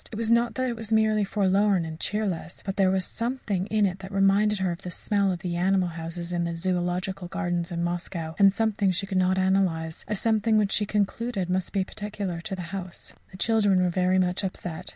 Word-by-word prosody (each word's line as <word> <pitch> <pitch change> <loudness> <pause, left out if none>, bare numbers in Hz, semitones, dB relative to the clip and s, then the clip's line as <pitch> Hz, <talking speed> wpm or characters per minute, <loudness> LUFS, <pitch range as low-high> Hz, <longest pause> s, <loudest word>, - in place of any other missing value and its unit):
It - - -6
was 225 +1 0
not 235 0 +3
that 255 0 0
it 240 - -2
was 225 -1 -6
merely 220 -1 +3
forlorn 195 -2 +2
and 160 0 -7
cheerless, 190 -6 -3
but 195 -1 -3
there 195 -3 +3
was 190 -1 +1
a - - -5
something 230 -6 -2
in 215 -1 +2
it 190 -1 -2
that 190 0 -9
reminded 200 +2 +3
her 190 -2 0
of 170 +2 -6
the 180 - -6
smell 200 +2 +1
of 175 -1 -4
the 175 -3 -3
animal 185 +1 +2
houses 170 +1 -6
in 175 0 0
the 170 0 -2
Zoological 180 +1 -2
Gardens 175 -2 -2
in 170 0 -2
Moscow, 175 -2 -3
and 200 - +8
a - - +5
something 210 -1 +1
she 185 +2 -1
could 190 -1 0
not 185 +1 +2
analyse 185 -4 +1
a 210 - -1
something 220 +1 +2
which 205 -2 +2
she 210 - 0
concluded 210 -2 -1
must 185 0 -1
be 195 -2 +1
peculiar 200 -3 -5
to 195 +1 -4
the 175 -2 -7
house. 185 -2 -6 0.2
The 185 - -12
children 205 -3 +3
were 180 - +1
very 185 +1 +2
much 180 +1 +1
upset. 180 -2 -4
190 Hz, 230 wpm, -26 LUFS, 180-210 Hz, 0.2 s, and